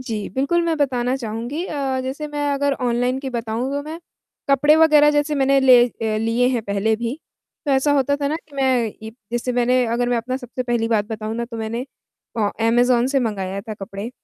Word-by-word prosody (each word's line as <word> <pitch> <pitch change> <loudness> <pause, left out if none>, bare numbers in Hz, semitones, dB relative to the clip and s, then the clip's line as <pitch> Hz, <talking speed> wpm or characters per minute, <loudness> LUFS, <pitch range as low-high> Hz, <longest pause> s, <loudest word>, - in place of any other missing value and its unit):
जी 225 -5 -4
बिल्कुल, 280 +6 +1
मैं 330 -1 0
बताना 255 -4 0
चाहूँगी। 240 +6 -4
अ, 270 -3 -2
जैसे 270 +4 -4
मैं 290 -1 -2
अगर 280 0 +1
ऑनलाइन 245 +1 0
की 270 -1 -5
बताऊँ 235 +1 -3
तो 285 +1 -2
मैं, 315 +3 -7 0.5
कपड़े 290 +3 +5
वग़ैरह 305 -2 +6
जैसे 295 +1 +1
मैंने 275 -1 +3
ले 255 -2 +7
अ, 220 -2 -3
लिए 230 +3 +1
हैं 245 -3 -1
पहले 200 +1 0
भी, 235 +2 -3 0.5
तो - - +1
ऐसा 270 +2 +3
होता 285 0 +2
था 280 - 0
ना 305 - -1
कि 315 -3 -16
मैं 260 -3 +2 0.2
ई 220 - -7 0.2
जैसे 240 +1 -1
मैंने 245 +1 +2
अगर 240 +1 0
मैं 245 - +1
अपना 250 +3 -2
सबसे 255 -1 -5
पहली 240 -2 -1
बात 220 -3 +2
बताऊँ 215 0 -5
ना 235 +1 -2
तो 235 -1 -8
मैंने 225 +2 -3 0.5
अ, 205 -2 +1 0.2
अमेज़न 240 +1 +3
से 270 +1 +1
मँगाया 200 -4 -3
था 215 +1 -7
कपड़े। 200 +2 -7
250 Hz, 210 wpm, -21 LUFS, 230-275 Hz, 0.5 s, ले